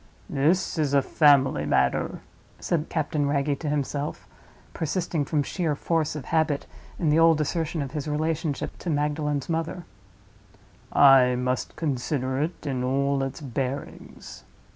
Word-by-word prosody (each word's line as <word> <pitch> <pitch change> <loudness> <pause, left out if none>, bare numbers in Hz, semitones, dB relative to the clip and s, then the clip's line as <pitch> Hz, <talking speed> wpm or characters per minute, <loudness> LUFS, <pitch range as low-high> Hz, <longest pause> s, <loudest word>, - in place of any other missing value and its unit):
"This 160 +5 +1
is 145 -2 +1
a 140 - +4
family 140 - +4
matter," 75 - 0 0.4
said 165 -2 -1
Captain 150 -2 -1
Wragge 140 0 0
to 155 - -3
himself, 145 0 -3 0.5
persisting, 165 -1 -1
from 145 0 0
sheer 160 -1 -1
force 160 0 -1
of 145 -4 -6
habit, 160 -3 0 0.3
in 160 -4 +1
the 155 - +4
old 165 -1 +5
assertion 155 +1 -1
of 135 - -7
his 150 0 -4
relationship 155 0 -2
to 175 - -5
Magdalen's 150 -2 -1
mother; 165 +1 -3 1.1
"I 130 -3 +6
must 125 0 -2
consider 130 -2 -1
it 160 +1 -4
in 130 -3 -2
all 140 +2 +1
its 135 +4 -4
bearings." 135 0 -6
145 Hz, 140 wpm, -25 LUFS, 135-160 Hz, 1.1 s, I